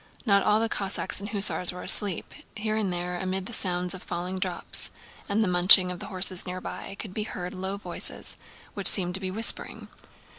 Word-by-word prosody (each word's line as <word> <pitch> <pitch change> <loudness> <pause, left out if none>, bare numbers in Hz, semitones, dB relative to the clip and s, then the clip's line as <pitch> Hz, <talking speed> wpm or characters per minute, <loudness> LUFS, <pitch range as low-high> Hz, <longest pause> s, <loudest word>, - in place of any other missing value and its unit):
Not 200 -3 +3
all 210 +2 +2
the 225 - 0
Cossacks 195 -3 -1
and 205 +1 -7
hussars 200 -3 +6
were 180 - -9
asleep; 200 -5 +1 0.2
here 215 0 -2
and 210 -4 -1
there, 175 0 -4
amid 185 0 -3
the 235 - -8
sounds 180 -3 +1
of 185 - -9
falling 180 +2 -5
drops 185 -2 -3 0.4
and 210 +2 +1
the - - 0
munching 180 +1 +6
of 180 - -8
the - - -6
horses 185 -2 0
near 180 0 -6
by, 195 - -8
could 200 -3 -7
be 215 - -3
heard 180 -4 -6
low 190 +2 -5
voices 200 - -4 0.4
which - - +1
seemed 180 -3 +5
to 190 - -2
be 190 -1 -4
whispering. 220 +5 -2
190 Hz, 200 wpm, -26 LUFS, 180-205 Hz, 0.4 s, hussars